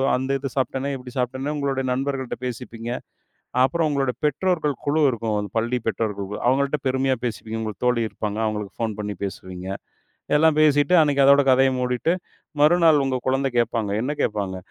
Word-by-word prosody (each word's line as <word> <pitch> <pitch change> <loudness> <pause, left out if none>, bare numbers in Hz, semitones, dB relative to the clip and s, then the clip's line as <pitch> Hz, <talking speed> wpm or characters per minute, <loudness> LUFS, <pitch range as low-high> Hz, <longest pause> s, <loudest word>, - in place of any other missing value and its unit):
அந்த 130 +2 -2
இது 135 0 -4
சாப்ட்டனே, 135 +1 -1
இப்படி 125 -1 -11
சாப்ட்டனே." 130 +3 -2
உங்களோட 140 -2 -1
நண்பர்கள்ட்ட 135 -1 -3
பேசிப்பீங்க. 115 -1 -6 0.8
அப்புறம் 165 +3 0
உங்களோட 135 -3 0
பெற்றோர்கள் 150 0 0
குழு 155 +2 +2
இருக்கும். 110 -3 -2
பள்ளி 120 +2 -1
பெற்றோர்கள் 105 -3 -2
குழு. 105 - -5
அவங்கள்ட்ட 140 +3 +1
பெருமையா 130 0 +1
பேசிப்பீங்க. 110 -1 -4
உங்களுக்குத் 110 +3 -3
தோழி 120 -1 +2
இருப்பாங்க. 105 0 -4
அவுங்களுக்கு 105 -2 -4
ஃபோன் 110 -2 -2
பண்ணி 105 0 -4
பேசுவீங்க. 95 -1 -7 0.7
எல்லாம் 155 0 +4
பேசிட்டு 145 +1 +4
அன்னைக்கு 145 -3 +3
அதோட 140 +1 +7
கதைய 130 +1 +5
மூடிட்டு, 125 +6 0 0.5
மறுநாள் 160 0 +5
உங்க 135 -1 0
குழந்த 135 +1 +1
கேப்பாங்க. 115 -3 +1
என்ன 130 +6 -1
கேப்பாங்க? 100 -3 -1
130 Hz, 155 wpm, -23 LUFS, 110-140 Hz, 0.8 s, அதோட